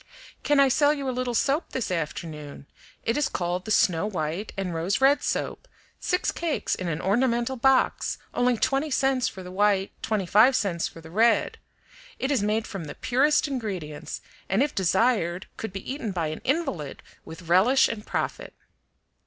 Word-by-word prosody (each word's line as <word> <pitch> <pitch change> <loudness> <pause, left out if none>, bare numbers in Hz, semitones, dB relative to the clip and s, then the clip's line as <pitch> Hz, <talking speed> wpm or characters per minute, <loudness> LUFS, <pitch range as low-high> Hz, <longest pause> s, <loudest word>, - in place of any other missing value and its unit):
"Can 290 -1 +2
I 275 - +7
sell 290 +3 +3
you 280 -2 -4
a - - +1
little 250 -1 -2
soap 280 +7 0
this 245 -7 -2
afternoon? 150 -3 -5 0.4
It 230 - 0
is 295 - +1
called 180 +1 -2
the - - -6
Snow 200 -3 +3
White 175 +1 -3
and 190 -3 -2
Rose 165 +4 0
Red 275 +2 +4
Soap, - - -3 0.3
six 360 0 0
cakes 330 -3 -2
in 185 - -3
an 160 -2 -2
ornamental 235 +6 +1
box, 265 +1 +2 0.2
only 245 -1 +2
twenty 275 +6 +1
cents 265 -2 +1
for 190 - -7
the 180 - -9
white, 200 0 +2
twenty 215 -4 -1
five 220 +9 +5
cents 180 -7 0
for 165 - -12
the 160 0 -12
red. 225 +5 +2 0.6
It 265 - -1
is 265 -7 +2
made 215 +2 0
from 195 -5 -6
the 145 - -8
purest 290 +5 +2
ingredients, 190 - -5 0.3
and 195 +7 +3
if 295 - -2
desired 190 -1 +1
could 220 - -5
be 195 +7 -5
eaten 255 -7 -4
by 170 -4 -1
an 155 - -6
invalid 265 - -2 0.2
with 165 +3 -10
relish 210 +10 +5
and 215 -2 -5
profit." - - -4
215 Hz, 180 wpm, -26 LUFS, 180-265 Hz, 0.6 s, I